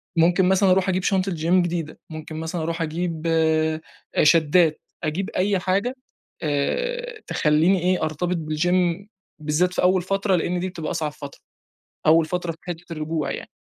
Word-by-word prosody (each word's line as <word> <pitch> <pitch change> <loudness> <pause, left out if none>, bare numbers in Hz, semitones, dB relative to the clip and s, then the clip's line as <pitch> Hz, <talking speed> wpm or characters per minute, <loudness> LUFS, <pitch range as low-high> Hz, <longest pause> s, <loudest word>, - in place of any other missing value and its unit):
ممكن 175 +3 +4
مثلًا 190 0 +4
أروح 190 0 +3
أجيب 185 0 0
شنطة 190 -1 +1
gym 170 +2 +2
جديدة، 170 -2 -4
ممكن 155 0 -8
مثلًا 160 +2 -4
أروح 165 +1 -3
أجيب 165 0 -3
آآ 160 -1 +2 0.4
شداد، 160 +1 +4 0.3
أجيب 170 +5 -2
أي 195 +1 +1
حاجة 195 +8 0 0.5
آآ، 485 - -2
تخلّيني 160 +5 +3
إيه 180 0 +1
أرتبط 160 +3 -1
بالgym 175 +4 0 0.4
بالذات 155 +4 +1
في - - 0
أول 185 0 +3
فترة، 195 +1 0
لإن 175 +1 -1
دي 185 +1 -2
بتبقى 165 -4 -5
أصعب 160 -3 -2
فترة. 145 -1 -10 0.7
أول 160 +1 +6
فترة 175 0 -2
في 160 - -17
حتّة 175 0 -7
الرجوع 155 -2 -2
يعني. - - -6
170 Hz, 160 wpm, -23 LUFS, 155-185 Hz, 0.7 s, أول